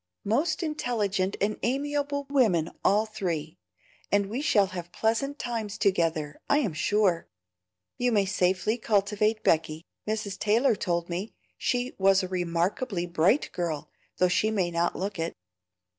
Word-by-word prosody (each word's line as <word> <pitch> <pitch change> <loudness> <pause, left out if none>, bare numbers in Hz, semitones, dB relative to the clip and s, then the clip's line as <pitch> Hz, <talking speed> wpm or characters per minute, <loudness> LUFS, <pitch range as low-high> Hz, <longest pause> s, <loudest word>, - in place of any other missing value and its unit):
"Most 305 - +1
intelligent 210 - -1
and 210 +2 0
amiable 285 +2 -1
women 200 - +3
all 210 +3 +4
three, 180 -7 -4 0.5
and 205 0 +3
we 250 +5 -2
shall 210 -9 +4
have 175 -1 -6
pleasant 250 +9 0
times 225 -5 -3
together, 165 -7 0
I 285 - +5
am 220 - 0
sure. 190 0 +1 0.7
You 245 0 +2
may 205 -3 +3
safely 190 +3 +1
cultivate 210 +1 +1
Becky; 155 0 +1 0.2
Mrs. 215 -2 -3
Taylor 225 +3 +3
told 170 -3 -1
me 180 +5 -4 0.2
she 250 +1 -1
was 195 0 +4
a - - -2
remarkably 180 +3 -1
bright 175 - +2
girl, 165 -4 -3 0.3
though 180 - +4
she 205 +4 +2
may 190 -5 0
not 170 +1 0
look 195 -1 -4
it." 165 +1 -2
200 Hz, 145 wpm, -27 LUFS, 175-230 Hz, 0.7 s, I